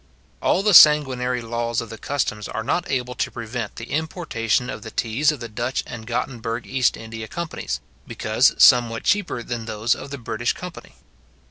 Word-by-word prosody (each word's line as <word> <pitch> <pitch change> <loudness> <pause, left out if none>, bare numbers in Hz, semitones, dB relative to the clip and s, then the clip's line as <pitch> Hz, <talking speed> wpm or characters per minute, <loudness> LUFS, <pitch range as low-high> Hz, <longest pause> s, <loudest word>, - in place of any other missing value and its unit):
All 195 - +2
the 210 -1 +3
sanguinary 130 -6 +6
laws 115 0 -2
of 115 - -6
the 115 - -7
customs 115 -7 -2
are 110 - -4
not 145 +9 -1
able 125 -2 -1
to 120 - -2
prevent 115 +1 -5
the 115 - -8
importation 145 - -1
of 115 - -6
the 110 - -8
teas 120 +8 +1
of 150 -4 -7
the 115 - -4
Dutch 120 +3 -2
and 115 -2 -9
Gottenburg 120 -1 -3
East 130 -2 +1
India 110 0 -7
companies; 155 - -4 0.3
because - - +2
somewhat 120 -2 +5
cheaper 195 -12 0
than 115 -2 -5
those 110 +1 0
of 140 - -8
the 140 - -5
British 120 -1 -2
company. 180 -2 -10
120 Hz, 175 wpm, -22 LUFS, 115-135 Hz, 0.3 s, sanguinary